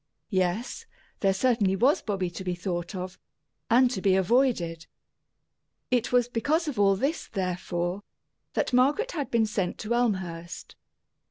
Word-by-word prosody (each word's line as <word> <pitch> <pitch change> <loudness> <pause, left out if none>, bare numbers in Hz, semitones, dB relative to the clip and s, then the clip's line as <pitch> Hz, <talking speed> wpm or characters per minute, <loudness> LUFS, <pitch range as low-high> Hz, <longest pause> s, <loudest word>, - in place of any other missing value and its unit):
Yes, 185 +4 -1 0.3
there 195 - +3
certainly 200 -2 +2
was 255 +9 +3
Bobby 190 -5 -2
to 190 - -7
be 180 -1 -2
thought 175 +1 -4
of 185 0 -6 0.5
and 245 +2 +5
to 190 - -3
be 190 -1 +3
avoided. 190 -6 +1 1.0
It 245 -2 +1
was 245 -1 +3
because 300 +8 0
of 275 -8 -3
all 195 -1 +5
this, 275 - -1
therefore, 180 -1 -2 0.5
that - - -1
Margaret 290 - +3
had 290 -5 -3
been 230 -2 +3
sent 200 -4 -2
to 220 +2 -2
Elmhurst. 185 -8 -2
200 Hz, 145 wpm, -27 LUFS, 180-245 Hz, 1.0 s, and